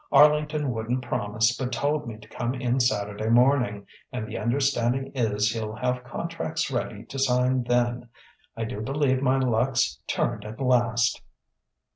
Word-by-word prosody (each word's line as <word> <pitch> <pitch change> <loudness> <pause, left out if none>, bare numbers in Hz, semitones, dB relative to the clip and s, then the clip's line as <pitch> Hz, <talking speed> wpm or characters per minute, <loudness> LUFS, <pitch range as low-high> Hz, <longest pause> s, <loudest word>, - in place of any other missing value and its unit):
Arlington 150 -1 +4
wouldn't 120 +2 -2
promise, 110 +1 0
but 130 0 -3
told 145 +3 -1
me 110 -2 -6
to 110 0 -15
come 120 +3 -3
in 125 0 0
Saturday 105 -3 0
morning, 120 -4 +3 0.3
and 110 - -4
the - - -7
understanding 130 +1 0
is 110 -4 +1
he'll 110 -2 -4
have 125 +1 -1
contracts 160 +3 -3
ready 110 -4 -3
to 135 - -7
sign 125 -1 +2
then. 120 0 0 0.5
I 115 - -2
do 110 -2 -5
believe 130 +1 +1
my 130 0 +3
luck's 120 - +1
turned - - -1
at 110 +3 -8
last!" 120 -3 +2
125 Hz, 150 wpm, -26 LUFS, 110-135 Hz, 0.5 s, Arlington